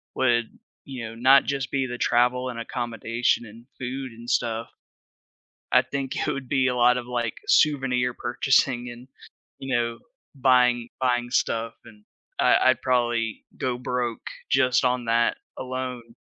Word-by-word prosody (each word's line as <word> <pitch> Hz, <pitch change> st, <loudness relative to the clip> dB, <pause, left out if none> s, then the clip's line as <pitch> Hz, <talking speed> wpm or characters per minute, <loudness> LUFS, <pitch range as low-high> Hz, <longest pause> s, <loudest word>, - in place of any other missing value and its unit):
would, 120 Hz, -3 st, +2 dB, 0.4 s
you 130 Hz, -4 st, -6 dB
know, 115 Hz, -, -10 dB
not 130 Hz, +4 st, +6 dB
just 135 Hz, -1 st, -2 dB
be 135 Hz, -2 st, 0 dB
the 120 Hz, -, -5 dB
travel 125 Hz, +2 st, +2 dB
and 115 Hz, -1 st, -6 dB
accommodation 120 Hz, 0 st, -1 dB
and 115 Hz, +2 st, -14 dB
food 130 Hz, 0 st, -5 dB
and 115 Hz, +1 st, -10 dB
stuff, 115 Hz, -2 st, 0 dB, 1.0 s
I -, -, +6 dB
think 135 Hz, -1 st, -4 dB
it -, -, -2 dB
would 135 Hz, -2 st, -5 dB
be 135 Hz, -2 st, +2 dB
a 125 Hz, -, 0 dB
lot 125 Hz, 0 st, +4 dB
of, 120 Hz, -, -4 dB
like, 120 Hz, -1 st, -2 dB
souvenir 135 Hz, -, +2 dB
purchasing 125 Hz, 0 st, +1 dB
and, 120 Hz, +2 st, -11 dB, 0.5 s
you 135 Hz, -2 st, -2 dB
know, 115 Hz, -1 st, -1 dB, 0.4 s
buying 125 Hz, -2 st, +3 dB
buying 120 Hz, -1 st, +1 dB
stuff 115 Hz, -2 st, 0 dB
and 105 Hz, -1 st, -16 dB, 0.4 s
I -, -, +5 dB
I'd 130 Hz, -, +2 dB
probably 120 Hz, -3 st, 0 dB
go 125 Hz, -1 st, -2 dB
broke 125 Hz, -2 st, -3 dB, 0.2 s
just 125 Hz, 0 st, +3 dB
on 125 Hz, -1 st, 0 dB
that 115 Hz, +1 st, +2 dB, 0.2 s
alone. 125 Hz, -2 st, -5 dB
125 Hz, 150 wpm, -25 LUFS, 120-130 Hz, 1.0 s, not